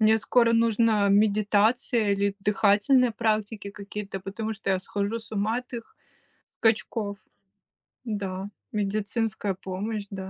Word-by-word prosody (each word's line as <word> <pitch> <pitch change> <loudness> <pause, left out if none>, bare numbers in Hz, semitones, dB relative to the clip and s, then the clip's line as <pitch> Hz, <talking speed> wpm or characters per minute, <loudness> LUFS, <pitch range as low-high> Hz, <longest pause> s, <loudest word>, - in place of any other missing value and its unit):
Мне 220 0 +5
скоро 235 -2 +4
нужна 225 -1 +3 0.3
медитация 215 +3 +2
или 200 0 0
дыхательные 215 +5 +4
практики 215 -1 0
какие-то, 200 0 -6
потому 215 +3 -4
что 220 - -20
я - - -3
схожу 205 +3 -2
с - - -8
ума 210 +2 0
от - - -41
их 230 - -12 0.7
скачков. 220 -2 +1 0.9
Н-да. 200 -4 -3 0.4
Медицинская 205 0 -1
помощь, 205 +3 -3
да. 190 0 -6
210 Hz, 120 wpm, -26 LUFS, 200-225 Hz, 0.9 s, Мне